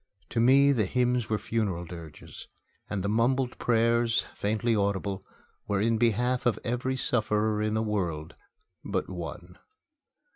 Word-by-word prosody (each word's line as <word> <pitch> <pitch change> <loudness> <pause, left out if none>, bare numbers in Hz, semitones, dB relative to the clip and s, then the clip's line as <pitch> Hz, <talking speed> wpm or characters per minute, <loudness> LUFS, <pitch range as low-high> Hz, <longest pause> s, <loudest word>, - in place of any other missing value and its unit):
To 120 - -1
me 135 +4 +6
the 110 -8 +1
hymns 125 0 +1
were 110 - +1
funeral 100 -5 -2
dirges; 80 -3 -10 0.4
and 100 -3 -2
the - - -1
mumbled 120 +4 +1
prayers, 115 0 +2
faintly 110 +3 0
audible, 100 -1 -1 0.4
were 100 -1 0
in 115 +2 +2
behalf 120 +2 +1
of 115 - +2
every 125 +2 -1
sufferer 110 -3 0
in 110 0 0
the 110 - +1
world 85 -8 -2 0.5
but - - -2
one. 90 +1 -7
110 Hz, 140 wpm, -28 LUFS, 100-120 Hz, 0.5 s, me